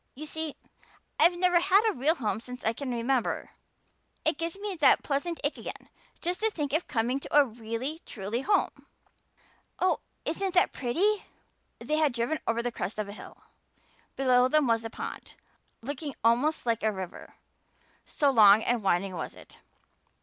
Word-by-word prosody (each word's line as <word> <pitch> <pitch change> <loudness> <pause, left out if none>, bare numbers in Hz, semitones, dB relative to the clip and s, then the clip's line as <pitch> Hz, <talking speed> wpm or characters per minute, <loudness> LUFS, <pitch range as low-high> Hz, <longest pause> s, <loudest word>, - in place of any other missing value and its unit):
You 305 +4 -7
see, 315 -1 -4 0.6
I've 350 0 +6
never 355 -1 +4
had 395 +5 +4
a 435 - +2
real 300 +4 +1
home 220 -7 -2
since 250 +2 -9
I 225 - +2
can 275 +3 -5
remember. 245 +1 -1 0.7
It - - +2
gives 335 +2 -3
me 405 0 -4
that 300 - +5
pleasant 310 +4 -2
ache 285 - 0
again - - -8 0.3
just 355 +2 -2
to 445 - +2
think 295 -9 -4
of 320 +3 0
coming 240 +4 0
to 285 - -1
a 290 - +6
really 235 +6 -5
truly 215 +3 -4
home. 400 +8 0 0.9
Oh, 370 0 +1 0.3
isn't 375 +3 -2
that 360 - +4
pretty!" 380 - 0 0.5
They 305 - -2
had 305 -4 +2
driven 240 +6 -1
over 230 +1 0
the 245 - -1
crest 195 -1 -4
of 210 -1 -3
a - - -7
hill. - - -12 0.7
Below 255 -2 +4
them 305 +2 +3
was 230 -2 +1
a 225 - -5
pond, - - -7 0.5
looking 285 +2 -5
almost 245 +8 +2
like 230 -1 0
a 220 - +2
river 190 -3 -8 0.7
so 285 -2 +1
long 215 -3 +7
and 245 -1 +1
winding 190 0 +1
was 175 - -5
it. - - -16
270 Hz, 170 wpm, -28 LUFS, 230-320 Hz, 0.9 s, long